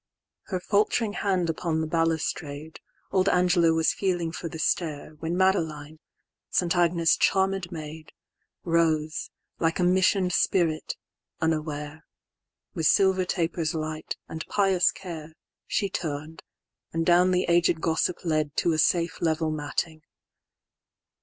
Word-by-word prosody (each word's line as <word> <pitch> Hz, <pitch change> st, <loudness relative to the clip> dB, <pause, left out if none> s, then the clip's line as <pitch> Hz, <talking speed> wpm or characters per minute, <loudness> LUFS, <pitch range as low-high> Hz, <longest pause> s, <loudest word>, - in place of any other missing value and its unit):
XXII.Her 185 Hz, -, -2 dB
falt'ring 210 Hz, +2 st, +1 dB
hand 185 Hz, -5 st, 0 dB
upon 165 Hz, 0 st, -1 dB
the 160 Hz, -, 0 dB
balustrade, 160 Hz, -2 st, -2 dB, 0.3 s
Old 190 Hz, 0 st, +3 dB
Angela 180 Hz, -2 st, +3 dB
was 160 Hz, 0 st, +2 dB
feeling 175 Hz, -4 st, -1 dB
for 165 Hz, 0 st, -5 dB
the 160 Hz, -, -7 dB
stair, 155 Hz, -2 st, -1 dB
When 165 Hz, +3 st, -2 dB
Madeline, 160 Hz, -5 st, 0 dB, 0.5 s
St. 175 Hz, -1 st, +1 dB
Agnes' 170 Hz, -1 st, +3 dB
charmed 190 Hz, -2 st, +1 dB
maid, 155 Hz, -1 st, -8 dB, 0.5 s
Rose, 160 Hz, -2 st, +1 dB, 0.3 s
like 165 Hz, 0 st, +1 dB
a 180 Hz, -, +1 dB
mission'd 185 Hz, 0 st, +3 dB
spirit, 165 Hz, -5 st, +1 dB, 0.4 s
unaware:With 155 Hz, 0 st, -4 dB
silver 190 Hz, -1 st, +3 dB
taper's 165 Hz, -2 st, -1 dB
light, 155 Hz, 0 st, -4 dB
and 160 Hz, 0 st, -6 dB
pious 195 Hz, -3 st, +3 dB
care, 165 Hz, -4 st, -8 dB, 0.3 s
She 200 Hz, -, 0 dB
turn'd, 155 Hz, -3 st, -5 dB, 0.5 s
and 165 Hz, 0 st, -1 dB
down 175 Hz, +1 st, +5 dB
the 180 Hz, 0 st, +2 dB
aged 170 Hz, -1 st, +3 dB
gossip 165 Hz, +2 st, 0 dB
ledTo 155 Hz, +1 st, +1 dB
a 155 Hz, -, 0 dB
safe 170 Hz, +1 st, +1 dB
level 160 Hz, -1 st, +1 dB
matting. 155 Hz, +1 st, -3 dB
165 Hz, 120 wpm, -26 LUFS, 155-180 Hz, 0.5 s, down